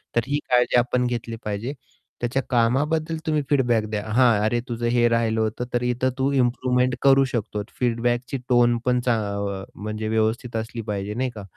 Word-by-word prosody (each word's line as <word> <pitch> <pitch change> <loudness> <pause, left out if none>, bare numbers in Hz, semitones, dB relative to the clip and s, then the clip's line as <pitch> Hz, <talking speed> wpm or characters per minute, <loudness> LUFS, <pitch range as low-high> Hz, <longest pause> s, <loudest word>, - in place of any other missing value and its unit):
तर 120 - +4
ही 145 +1 0
काळजी 125 0 +3
आपण 125 0 +1
घेतली 115 -1 -3
पाहिजे. 105 +6 -3 0.5
त्याच्या 125 +3 0
कामाबद्दल 150 +7 +1
तुम्ही 155 -1 +1
फीडबॅक 120 -6 +2
द्या. 105 -1 -2
हां, 120 -4 +4
"अरे, 120 +2 +1
तुझं 120 0 -3
हे 120 0 +3
राहिलं 115 -1 +1
होतं 110 +3 -2
तर 120 - +1
इथं 125 +1 +1
तू 135 +1 +1
इम्प्रूवमेंट 125 0 +1
करू 135 0 +5
शकतो." 105 -3 -2 0.2
फीडबॅकची 120 +2 0
टोन 120 -1 +4
पण 125 0 +2
चा 125 - +3 0.5
अ, - - -8
म्हणजे 110 +1 -4
व्यवस्थित 110 +2 0
असली 115 +1 -4
पाहिजे 100 +1 -3
नाही 130 +2 -1
का? 105 - -7
120 Hz, 175 wpm, -23 LUFS, 115-125 Hz, 0.5 s, करू